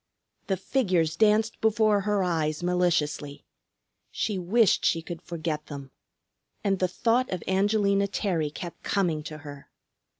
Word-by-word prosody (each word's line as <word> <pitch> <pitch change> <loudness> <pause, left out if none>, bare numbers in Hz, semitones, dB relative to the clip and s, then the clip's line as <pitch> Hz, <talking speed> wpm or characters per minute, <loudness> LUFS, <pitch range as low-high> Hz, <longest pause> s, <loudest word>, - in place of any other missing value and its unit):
The 190 - 0
figures 180 -10 +1
danced 220 +1 +2
before 215 -2 +3
her 205 -1 +1
eyes 160 -2 -1
maliciously. 165 -5 0 0.6
She 210 -4 -2
wished 205 +4 +3
she 165 -1 +2
could 170 0 -7
forget 160 -2 -4
them. 140 -3 -8 0.7
And 195 -2 +1
the 185 - +2
thought 235 +7 +1
of 180 -3 -4
Angelina 200 +1 +2
Terry 180 -6 -1
kept 170 +3 -8
coming 175 -6 0
to 155 0 -7
her. 145 -2 -11
180 Hz, 135 wpm, -27 LUFS, 160-205 Hz, 0.7 s, before